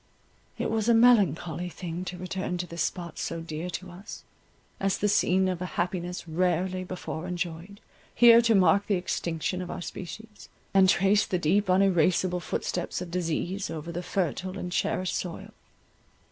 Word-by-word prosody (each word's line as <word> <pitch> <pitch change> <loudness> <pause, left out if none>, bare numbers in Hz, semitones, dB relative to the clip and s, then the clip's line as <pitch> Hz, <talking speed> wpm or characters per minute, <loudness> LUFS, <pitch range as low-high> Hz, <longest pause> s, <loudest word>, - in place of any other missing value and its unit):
It - - -2
was 220 0 0
a 235 - +6
melancholy 180 - +3
thing 175 +1 -6
to 180 0 -5
return 185 0 -3
to 175 - -3
this 170 -1 -5
spot 170 -1 -3
so 165 - -3
dear 165 +1 -5
to 180 +2 -6
us, 195 +5 -10 0.6
as 195 0 +1
the 210 - +1
scene 190 -2 +3
of 180 -1 -2
a 180 - -2
happiness 175 0 -2
rarely 180 +2 0
before 180 -2 -6
enjoyed, 180 +2 -5 0.4
here 235 -1 +8
to 230 -1 +3
mark 195 +1 +4
the 205 - +2
extinction 175 0 -2
of 180 - -6
our - - -5
species, 210 +5 -9 0.2
and 190 -1 +6
trace 195 +3 +3
the 185 - 0
deep 185 +4 +1
uneraseable 185 -1 +3
footsteps 175 0 -3
of 180 -1 -7
disease 180 +2 -2
over 165 +1 -5
the 175 +1 -4
fertile 185 +1 -2
and 180 -2 -5
cherished 185 0 -1
soil. 175 -2 -5
180 Hz, 165 wpm, -27 LUFS, 175-195 Hz, 0.6 s, here